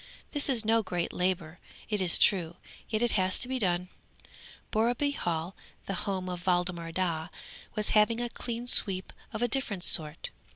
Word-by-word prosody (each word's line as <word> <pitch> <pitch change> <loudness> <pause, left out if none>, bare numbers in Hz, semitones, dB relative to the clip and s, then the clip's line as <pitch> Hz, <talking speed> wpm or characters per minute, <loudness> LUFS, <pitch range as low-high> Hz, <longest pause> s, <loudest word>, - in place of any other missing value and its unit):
This 290 -1 0
is 235 -5 0
no 225 +1 +3
great 175 -4 -3
labour, 175 -3 -2 0.3
it 210 -3 -1
is 180 -2 +4
true, 175 -4 +2 0.3
yet 220 0 0
it 240 - +2
has 185 -1 +1
to - - 0
be 260 0 -2
done. 180 -3 0 0.8
Borreby 240 +6 +1
Hall, 170 - -3 0.3
the 195 - -3 0.2
home 185 -2 -3
of 180 -1 -5
Waldemar 175 -2 0
Daa, 165 -3 -2 0.5
was 210 0 -2
having 220 +2 +3
a 240 - -1
clean 235 0 -6
sweep 190 -6 +4 0.2
of 220 +1 -3
a - - +3
different 220 -7 -2
sort. 155 -4 +4
190 Hz, 170 wpm, -29 LUFS, 175-230 Hz, 0.8 s, is